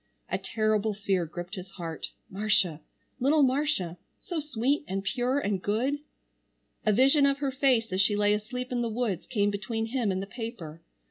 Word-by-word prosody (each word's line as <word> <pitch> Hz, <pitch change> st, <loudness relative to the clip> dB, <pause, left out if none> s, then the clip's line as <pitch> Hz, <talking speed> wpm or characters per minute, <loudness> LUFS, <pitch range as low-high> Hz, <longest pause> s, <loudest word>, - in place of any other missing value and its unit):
A -, -, 0 dB
terrible 215 Hz, -1 st, +1 dB
fear 195 Hz, -4 st, 0 dB
gripped 175 Hz, +3 st, -7 dB
his 185 Hz, -2 st, -6 dB
heart, 165 Hz, -4 st, -5 dB, 0.2 s
Marcia, 195 Hz, -5 st, +1 dB, 0.4 s
little 285 Hz, +4 st, +4 dB
Marcia, 260 Hz, -, +1 dB, 0.2 s
so 345 Hz, -3 st, -3 dB
sweet 285 Hz, -1 st, 0 dB
and 195 Hz, +1 st, -2 dB
pure 245 Hz, +6 st, 0 dB
and 205 Hz, -8 st, 0 dB
good. 250 Hz, +9 st, 0 dB, 0.9 s
A -, -, +6 dB
vision 275 Hz, +6 st, +5 dB
of 275 Hz, 0 st, +2 dB
her 280 Hz, -1 st, -1 dB
face 255 Hz, -6 st, +2 dB
as 190 Hz, -, +3 dB
she 205 Hz, +1 st, +3 dB
lay 205 Hz, 0 st, +3 dB
asleep 250 Hz, +5 st, -3 dB
in 245 Hz, -1 st, 0 dB
the 235 Hz, -, 0 dB
woods 220 Hz, -6 st, -2 dB
came 205 Hz, -4 st, +1 dB
between 225 Hz, +3 st, -2 dB
him 230 Hz, -3 st, 0 dB
and 185 Hz, -, -1 dB
the 195 Hz, -, -3 dB
paper. 195 Hz, -8 st, -7 dB
215 Hz, 180 wpm, -28 LUFS, 195-255 Hz, 0.9 s, A